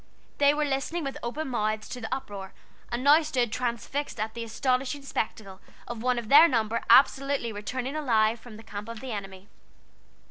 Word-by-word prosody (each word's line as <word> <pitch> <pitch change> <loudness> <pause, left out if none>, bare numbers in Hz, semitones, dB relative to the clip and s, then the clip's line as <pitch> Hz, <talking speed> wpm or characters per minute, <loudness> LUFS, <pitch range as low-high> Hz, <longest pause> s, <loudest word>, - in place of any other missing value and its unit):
They 285 0 +6
were 300 0 +1
listening 290 +5 -2
with 275 -1 -4
open 270 +5 -4
mouths 215 -3 -1
to 250 - -6
the 225 - -6
uproar, 205 -8 -5 0.4
and 240 +2 -2
now 295 +3 +7
stood 255 -7 -1
transfixed 250 +4 -3
at 220 +1 -2
the 235 - -5
astonishing 255 +4 -1
spectacle 210 -7 -4 0.3
of 240 -2 -6
one 250 0 +1
of 235 -2 -4
their 300 +7 +9
number 230 -4 0
absolutely 275 -3 +4
returning 255 +7 -4
alive 230 -6 +2
from 220 -2 -12
the 225 - -12
camp 210 0 -7
of 230 -1 -7
the 260 +1 -6
enemy. 195 -2 -7
240 Hz, 180 wpm, -27 LUFS, 220-275 Hz, 0.4 s, their